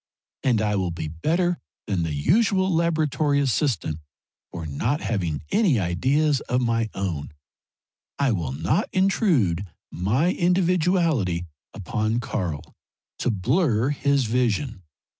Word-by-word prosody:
And 120 -5 +2
I 105 -1 +1
will 95 -2 0
be 80 -2 -4
better 170 - 0 0.3
than 95 -4 -1
the 80 -2 -2
usual 190 - +2
laboratory 155 -3 +1
assistant, 125 - 0 0.5
for 85 -2 -6
not 110 - -1
having 85 -10 -2
any 185 - +3
ideas 135 - +1
of 125 - +2
my 115 -2 0
own 85 -7 -3 0.8
I 140 -3 +2
will 85 -10 -2
not 80 - 0
intrude 170 - +2 0.3
my 110 - +1
individuality 175 - +1 0.3
upon 110 +4 -2
Karl 90 -10 -3 0.6
to - - 0
blur 120 - +1
his 140 -2 +1
vision. 120 -1 0
120 Hz, 120 wpm, -24 LUFS, -, 0.8 s, any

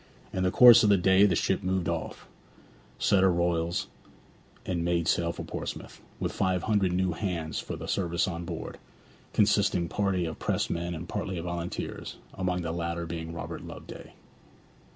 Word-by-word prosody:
In 95 - -1
the 90 - +3
course 120 +4 +9
of 105 - +4
the 100 - +6
day 95 +2 +5
the 90 - +1
ship 95 +4 +1
moved 95 -3 -1
off, - - -4 0.7
set 95 - +3
her 95 -1 +5
royals, 85 +2 0 0.8
and 85 -2 -1
made 85 -1 0
sail 85 0 +2
for - - -7
Portsmouth, - - -6 0.2
with - - -1
five 95 -2 0
hundred 105 -4 +2
new 90 0 +1
hands 85 -3 -3
for - - -5
the - - -7
service 85 -3 0
on 85 -2 -4
board, - - -6 0.5
consisting 100 -4 +2
partly 95 -1 0
of 80 - -5
pressed - - -1
men 85 +1 -2
and 85 +2 -7
partly 95 0 -3
of 85 - -5
volunteers, 85 0 -5 0.2
among 90 -1 -1
the 80 - -2
latter 85 0 -3
being 80 -1 -5
Robert 85 - -6
Loveday. - - -10
90 Hz, 170 wpm, -28 LUFS, 85-95 Hz, 0.8 s, course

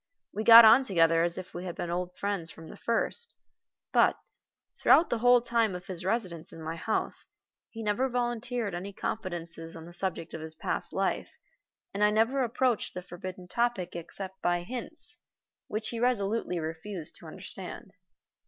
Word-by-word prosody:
We 215 - -2
got 230 0 +11
on 230 +5 +8
together 165 -7 +3
as 170 0 0
if 185 - -7
we 175 - -5
had 175 - -5
been 170 - -4
old 180 +1 -3
friends 200 -5 -2
from 160 0 -11
the - - -10
first; 350 - -2 0.6
but, - - +5 0.6
throughout 340 - +6
the 235 - +1
whole 245 +1 +6
time 230 -5 +1
of 180 0 -7
his 180 -3 -6
residence 185 -5 -2
in - - -11
my 160 +1 -3
house, 215 +6 -1 0.4
he 225 -1 -7
never 220 +6 +1
volunteered 240 -3 -2
any 190 +3 -5
confidences 170 -6 -5
on 165 -1 -9
the 175 - -12
subject 175 -2 -3
of 160 - -5
his 160 0 -6
past - - -3
life, - - -1 0.6
and 205 - 0
I 210 - +6
never 225 +6 +2
approached 245 -3 0
the 180 - -5
forbidden 180 0 -8
topic 235 -4 -1
except 190 +3 -7
by 175 0 +1
hints, 245 +6 -6 0.5
which 215 +1 -2
he 230 - -4
resolutely 225 -5 0
refused 165 +2 -5
to - - -12
understand. - - -9
195 Hz, 170 wpm, -29 LUFS, 175-230 Hz, 0.6 s, got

